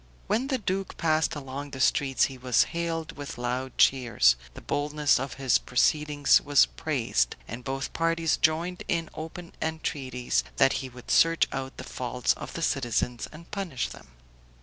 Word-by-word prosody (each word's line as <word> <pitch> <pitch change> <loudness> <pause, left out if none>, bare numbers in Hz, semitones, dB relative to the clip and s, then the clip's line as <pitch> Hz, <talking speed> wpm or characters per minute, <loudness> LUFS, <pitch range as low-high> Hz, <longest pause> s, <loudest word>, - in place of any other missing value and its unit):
When 245 +5 0
the 270 -2 0
duke 195 -3 -3
passed 155 -1 +1
along 140 0 -6
the 135 - -8
streets 135 0 +2
he 135 - 0
was 125 -2 +3
hailed 165 -1 -2
with 145 -3 -7
loud 125 +2 -3
cheers, 115 - +4 0.2
the - - -9
boldness 150 -1 +1
of 135 0 -4
his 135 -3 +2
proceedings 145 +3 +3
was 145 -1 +5
praised, 115 - -1
and 120 +3 -7
both 135 +2 -4
parties 165 -1 +1
joined 170 +3 +1
in 165 -2 -1
open 165 +2 -8
entreaties 135 -6 -1
that 135 - +4
he 130 - -6
would 125 0 -9
search 165 0 +4
out 135 0 -5
the - - -6
faults 125 0 -1
of - - -8
the 165 - -4
citizens, 125 -4 0
and 165 +2 -13
punish 185 -10 -3
them. - - -12
145 Hz, 165 wpm, -27 LUFS, 130-165 Hz, 0.2 s, was